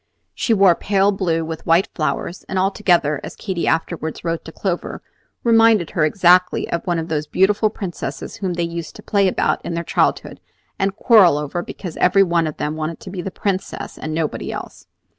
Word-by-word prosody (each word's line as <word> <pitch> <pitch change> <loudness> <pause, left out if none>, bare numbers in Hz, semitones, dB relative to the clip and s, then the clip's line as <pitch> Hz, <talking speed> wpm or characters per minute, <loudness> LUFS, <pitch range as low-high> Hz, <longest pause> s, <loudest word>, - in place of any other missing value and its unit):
She - - -2
wore 195 -4 +6
pale 200 +3 +1
blue 170 -4 -1
with 160 +1 -7
white 170 +3 +4
flowers, 155 +3 -3
and 190 - -2
altogether, 180 -6 +2
as - - -8
Katy 185 -5 -3
afterward 160 -1 -1
wrote 165 -1 -2
to 160 - -8
Clover, 175 0 -4 0.4
reminded 225 -6 +4
her 160 - +1
exactly 180 +2 +3
of 170 - -1
one 175 -1 +1
of 165 0 -3
those 150 -2 -2
beautiful 205 +6 +2
princesses 195 -5 -6
whom 190 -3 -2
they 170 - -1
used 170 -1 -5
to - - -12
play 200 -2 +2
about 185 - 0
in 170 - -4
their 170 - -2
childhood - - 0 0.4
and 195 0 0
quarrel 205 - +5
over, 150 +4 -3
because 175 -1 -8
every 195 +2 +4
one 170 -3 +1
of 155 - -6
them 150 +1 -2
wanted 155 +1 -4
to 185 - -9
be 185 -2 -4
the 195 - -4
Princess 195 0 -4
and 155 - -5
nobody 155 -1 -2
else. - - -8
175 Hz, 195 wpm, -20 LUFS, 165-195 Hz, 0.4 s, wore